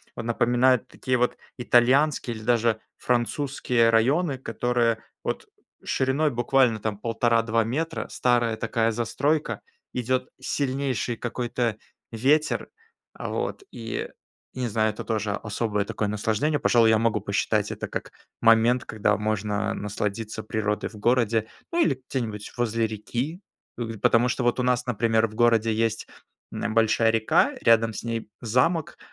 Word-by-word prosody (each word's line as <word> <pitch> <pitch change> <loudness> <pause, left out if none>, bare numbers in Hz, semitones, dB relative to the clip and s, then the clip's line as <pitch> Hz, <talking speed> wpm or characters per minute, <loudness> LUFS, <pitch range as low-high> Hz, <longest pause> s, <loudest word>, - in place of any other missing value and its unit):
вот - - -5
напоминают 120 +1 +2
такие 130 -1 -1
вот 125 0 0 0.2
итальянские 125 +1 +3
или 110 - -9
даже 115 -1 +2 0.2
французские 125 -1 +1
районы, 135 +6 +2
которые 120 -1 0 0.2
вот - - -3 0.4
шириной 135 +3 +1
буквально 120 -1 +2
там 105 -1 -3
1,5-2 115 0 +1
метра, 160 +9 -3
старая 120 -3 +1
такая 115 -1 0
застройка. 140 +7 -1 0.3
Идет 130 +1 -1
сильнейший 135 -3 -1
какой-то 120 -1 -2 0.3
ветер. 145 +7 +1 0.5
А, - - -5
вот - - -3
и, 115 -1 -5 0.5
не 130 -1 -2
знаю, 110 0 +1
это 105 - -7
тоже 110 -2 -1
особое 105 -1 -2
такое 105 - -2
наслаждение. 110 +8 0
Пожалуй, 115 -2 +4
я 110 - +5
могу 115 0 +1
посчитать - - 0
это - - -5
как - - -5 0.3
момент, 115 +2 +4
когда 105 -1 +1
можно 105 0 -1
насладиться 105 +2 -3
природой 105 -1 -2
в 110 - -14
городе, 115 0 +1 0.2
ну, 340 - 0
или 135 -3 +1
где-нибудь 110 -5 -4
возле 115 -1 +1
реки. 120 - -4 0.4
Э, 120 - -2 0.2
потому 120 +1 +4
что 125 - -1
вот 120 +1 +1
у - - +1
нас, 125 0 +1
например, 115 -1 +2
в 110 - -13
городе 115 -1 +3
есть, 110 0 -1 0.4
м, - - -6
нэ - - -1
большая 110 0 +3
река, 110 -1 +2
рядом 115 -1 +4
с - - -5
ней 115 -2 -4
замок, 130 +8 +1
115 Hz, 140 wpm, -25 LUFS, 110-125 Hz, 0.5 s, я